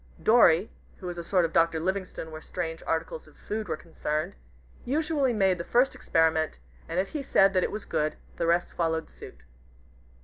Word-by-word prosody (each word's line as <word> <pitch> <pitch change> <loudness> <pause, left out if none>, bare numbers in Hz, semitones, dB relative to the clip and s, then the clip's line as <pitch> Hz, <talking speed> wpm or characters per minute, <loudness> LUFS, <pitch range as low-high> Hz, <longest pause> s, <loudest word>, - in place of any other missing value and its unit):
Dorry, 215 -5 +5 0.3
who 185 - -11
was 175 -1 -4
a - - -5
sort 180 0 +2
of 165 - -4
Dr. 165 -1 +3
Livingstone 185 -2 -3
where 155 0 -8
strange 165 -2 -5
articles 160 -1 -2
of 155 - -20
food 215 0 -4
were 160 -2 -2
concerned, 155 -1 -3 0.5
usually 290 -1 +1
made 190 -5 +2
the - - -2
first 245 +8 +2
experiment, 160 - +1 0.3
and 165 +2 -1
if 195 - 0
he 300 - -4
said 195 -7 +4
that 185 -1 +2
it - - 0
was 215 - -5
good, 155 0 -1 0.2
the 170 - 0
rest 170 +1 +1
followed 160 -1 -1
suit. - - -13
170 Hz, 190 wpm, -27 LUFS, 160-200 Hz, 0.5 s, Dorry